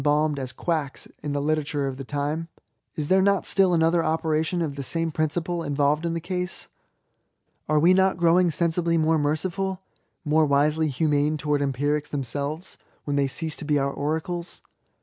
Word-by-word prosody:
balmed 150 0 +2
as 130 -1 -4
quacks 155 -5 -2 0.2
in 145 - -3
the 145 - -1
literature 145 -1 0
of 135 -1 -4
ihe 135 - -7
time? 150 +3 -2 0.5
Is 150 -2 -3
there 190 +3 +4
not 200 0 +2
still 195 -2 +3
another 165 0 +3
operation 160 +1 0
of 145 -3 -3
the 140 - -4
same 165 +4 -2
principle 160 +3 -1
inyblyed 145 0 +1
in 170 0 -1
the - - -1
case? 180 +1 -3 1.0
Are 155 - +3
we 170 +5 +5
not 190 -1 +3
growing 175 +1 +4
sensibly 170 +1 +1
more 160 0 +2
merciful^' 185 +6 -1 0.5
more 155 +1 +3
wisely 150 +3 +2
humane 150 +1 +1
towards 150 -1 0
empirics 145 +2 0
themselves^ 145 +5 -4 0.3
when 145 - -2
they 140 -1 +2
cease 160 +3 -2
to - - -7
be 150 -1 +1
our 140 0 0
oracles 160 +4 -3
155 Hz, 170 wpm, -25 LUFS, 145-170 Hz, 1.0 s, we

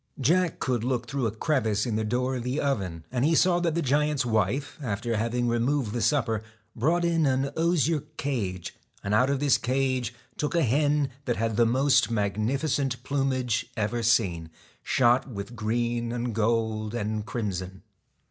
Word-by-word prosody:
Jack 170 +6 +2
could 125 -3 -1
look 125 -1 -1
through 130 -1 -1
a - - -2
crevice 110 -3 0
in 115 -3 -1
the 110 - 0
door 125 +4 -1
of 120 - -5
the 125 +4 -1
oven, 95 - -2
and 125 -1 0
he 160 +3 +3
saw 175 +1 +4
that 170 -2 0
the 170 - 0
giant's 145 0 +1
wife, 115 - 0
after 115 -1 -2
having 115 +3 0
removed 120 0 0
the 120 - -2
supper, 115 -4 +1 0.3
brought 165 +9 +1
in 165 -3 +2
an 135 +1 +1
osier 165 -1 +2 0.2
cage, 100 -11 -3 0.3
and 100 - -1
out 125 +5 +4
of 140 -1 0
this 145 -2 +3
cage 130 -2 -1 0.2
took 150 +2 -2
a 170 - +3
hen 145 +2 +2
that 120 - 0
had 115 +1 0
the 105 - -4
7 - - +2
TACK 115 - +1
most 135 -1 +3
magnificent 125 +5 -1
plumage 130 -4 0
ever 110 +2 -1
seen, 95 -8 +1 0.3
shot 125 +1 +3
with 100 -3 -6
AND 120 - -11
THE 110 - -11
green 120 +1 0
and 120 -1 -2
gold 110 0 0
and 110 -1 -2
crimson. 95 -6 -4
120 Hz, 185 wpm, -27 LUFS, 110-140 Hz, 0.3 s, saw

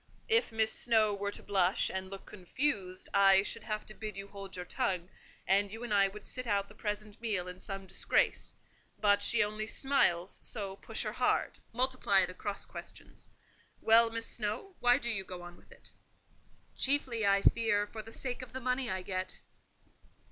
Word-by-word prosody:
If 455 - +3
Miss 220 0 +2
Snowe 220 -3 +4
were 200 0 -2
to - - -5
blush 190 -2 +2
and 190 0 -4
look 195 0 -9
confused, 190 -1 -2
I 195 -1 +6
should 230 +2 -2
have 215 -1 -4
to 215 - -7
bid 215 -2 -7
you 195 0 -6
hold 195 -1 -8
your 180 -1 -5
tongue; 185 -5 -1 0.4
and 200 +1 +3
you 225 +2 -7
and 235 -3 -2
I 200 -1 +5
would 205 +1 -10
sit 255 -1 -4
out 200 -2 +1
the 205 - -14
present 210 0 -5
meal 205 -6 -1
in 180 0 -8
some 195 -1 -7
disgrace; - - 0 0.4
but 205 -1 +4
she 235 -2 +3
only 215 +1 -4
smiles, 190 -10 +1
so 200 -4 -3
push - - 0
her - - -2
hard, - - +1
multiply 245 -6 +2
the 185 - -8
cross 200 +2 -3
questions. - - -11 0.5
Well, 230 +1 +6
Miss 230 0 -1
Snowe, 220 - -3
why 245 0 +5
do 240 - -4
you 195 -4 -1
go 180 -2 -8
on 175 0 -10
with - - -22
it?" - - -8 0.8
"Chiefly, 260 -5 +1
I 200 0 +3
fear, 225 -3 +3
for 220 +1 -7
the 225 - -12
sake 250 +2 -4
of 255 - -10
the 260 - -4
money 255 0 -1
I 185 0 -2
get." 185 -1 -5
210 Hz, 190 wpm, -32 LUFS, 195-230 Hz, 0.8 s, I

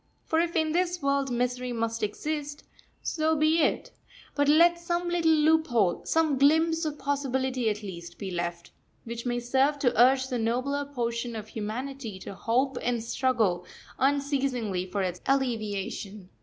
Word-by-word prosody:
For 320 - +1
if 340 0 0
in 315 -1 +2
this 355 +1 0
world 280 -1 +1
misery 250 +1 -1
must 230 -1 -2
exist, 290 +7 -3 0.4
so 320 0 +1
be 310 +2 +3
it; - - 0 0.4
but 285 0 +2
let 340 +3 +5
some 345 +1 -2
little 345 -2 +2
loophole, 305 - +3
some 315 -4 +2
glimpse 320 +3 +3
of 300 -1 -3
possibility 265 -4 -1
at 210 0 -3
least, 170 -3 -8
be 195 -2 -5
left, 170 -1 -4 0.3
which 235 +1 -6
may 240 0 0
serve 265 +4 +2
to 250 -3 +1
urge 260 +1 +5
the 250 -3 -1
nobler 255 +5 -1
portion 235 -3 -3
of 215 -1 -7
humanity 230 +1 -5
to 190 - -8
hope 245 +6 0
and 240 -2 -1
struggle 230 -8 +1 0.4
unceasingly 265 -9 0
for 195 +1 -2
its 180 -1 -3
alleviation. 215 -6 -2
260 Hz, 155 wpm, -27 LUFS, 225-295 Hz, 0.4 s, let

